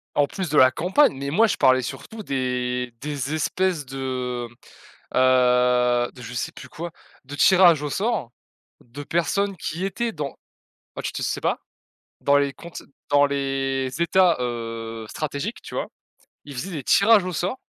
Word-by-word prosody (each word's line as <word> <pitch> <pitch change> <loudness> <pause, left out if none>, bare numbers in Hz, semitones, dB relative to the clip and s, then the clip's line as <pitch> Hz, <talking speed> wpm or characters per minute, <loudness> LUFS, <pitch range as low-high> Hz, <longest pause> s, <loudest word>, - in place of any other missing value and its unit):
En 145 -1 +3
plus 190 -5 -4
de 150 - +1
la 130 0 +7
campagne. 180 - +3
Mais 140 +1 -4
moi 220 +10 +4
je 210 - -1
parlais 130 0 +4
surtout 215 - -7
des 125 -3 -2
des 145 0 -3
espèces 165 0 0
de, 125 -2 -4 0.7
heu, 125 -1 +3
de 125 - -13
je 115 +1 -8
sais 120 - -3
plus 130 - -12
quoi, 170 +4 -6 0.3
de 145 +2 -7
tirage 175 -3 +6
au 150 - -3
sort 190 - -1 0.5
de 130 +5 -9
personnes 195 +5 0
qui 170 +3 -4
étaient 230 +5 -2
dans 150 -6 -5 0.6
ah - - -4
tu - - -3
te - - -5
sais - - -2
pas? - - 0 0.6
Dans 140 0 +3
les 140 -1 +2
comptes 170 +4 -10 0.3
dans 145 0 +5
les 135 -1 -1
états, 180 0 +4
heu, 115 -2 -4
stratégiques, 155 +8 -4
tu - - -10
vois? - - -2 0.6
Ils 145 - -9
faisaient 180 +10 -5
des 150 -6 -5
tirages 205 - +5
au 185 - -3
sort 185 +10 -2
140 Hz, 170 wpm, -23 LUFS, 125-175 Hz, 0.7 s, la